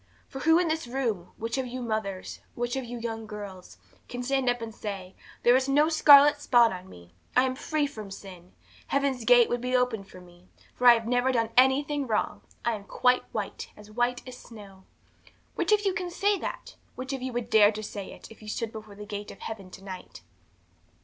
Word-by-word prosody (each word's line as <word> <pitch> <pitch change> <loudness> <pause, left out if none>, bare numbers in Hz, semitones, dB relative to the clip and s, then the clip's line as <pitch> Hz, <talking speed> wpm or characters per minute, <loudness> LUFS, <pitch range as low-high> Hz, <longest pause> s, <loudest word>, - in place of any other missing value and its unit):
For 270 - -8
who 320 +4 +4
in 350 -1 +2
this 315 -4 -2
room, 235 -8 -2
which 230 +3 -3
of 260 - -2
you 250 +1 -6
mothers, 215 -5 -4 0.2
which 240 +1 -2
of 265 - -2
you 240 0 -7
young 225 -1 -5
girls, 200 -3 -9 0.3
can 245 0 -5
stand 265 0 +1
up 245 0 0
and 225 -1 -6
say, 195 -4 -6 0.3
There 240 +1 +6
is 265 +1 +1
no 295 +3 +4
scarlet 290 -2 +7
spot 240 -6 +4
on 185 0 -9
me, 85 0 -15 0.2
I 255 - +7
am 260 -1 0
free 300 +3 -1
from 215 -8 -7
sin. 185 -2 -11 0.3
Heaven's 275 -3 0
gate 245 -1 +7
would 240 0 -2
be 250 +1 -1
opened 235 -6 0
to 185 - -12
me, 175 0 -18 0.3
for 250 - +2
I 240 - +10
have 230 -1 -3
never 245 +2 +2
done 230 -2 0
anything 275 +2 +3
wrong 215 -2 -1 0.2
I 235 - +2
am 205 -2 -7
quite 250 +3 +2
white, - - -5
as 210 0 -14
white 245 +3 -1
as 250 -1 -9
snow. 200 -4 -13 0.7
'Which - - -1
of 415 -1 +3
you 390 - +2
can 365 -1 -3
say 405 +4 +1
that? - - -6 0.2
Which 260 +2 -5
of 265 - -4
you 260 0 -3
would 240 -1 -4
dare 210 -1 +7
to 215 0 -6
say 205 -2 -6
it, - - -13
if 225 - -15
you 215 - -12
stood 220 +1 -3
before 215 -2 -10
the 210 +1 -9
gate 205 0 -6
of - - -12
heaven 200 -4 -7
to 185 - -12
night? 185 -2 -9
240 Hz, 220 wpm, -27 LUFS, 210-260 Hz, 0.7 s, I